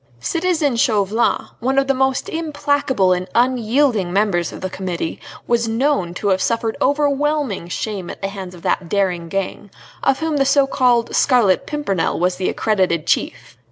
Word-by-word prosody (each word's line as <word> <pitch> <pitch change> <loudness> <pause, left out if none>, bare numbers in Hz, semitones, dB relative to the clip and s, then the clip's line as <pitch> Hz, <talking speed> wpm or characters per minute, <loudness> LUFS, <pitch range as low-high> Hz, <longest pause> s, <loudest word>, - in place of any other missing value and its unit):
Citizen 325 - 0
Chauvelin, 220 -3 +1
one 265 +3 -1
of 275 - +4
the 275 - +2
most 265 0 0
implacable 285 - 0
and 180 +1 -3
unyielding 240 -4 +2
members 195 -3 +1
of - - -9
the 185 - -2
Committee, 180 -4 -4 0.3
was 235 -1 +1
known 225 -5 0
to 205 - -1
have 190 -1 +2
suffered 230 0 0
overwhelming 285 - 0
shame 190 -1 -4
at - - -8
the 195 - -3
hands 190 -2 -8
of 170 - -14
that 175 -3 -1
daring 180 -4 0
gang, 195 +2 -4 0.3
of 265 - +2
whom 320 -2 -1
the 275 - +3
so 275 +1 +4
called 250 -3 +1
Scarlet 235 -8 +3
Pimpernel 290 - -1
was 180 +1 +1
the 185 - -1
accredited 185 -7 0
chief. - - -2
225 Hz, 165 wpm, -19 LUFS, 190-275 Hz, 0.3 s, of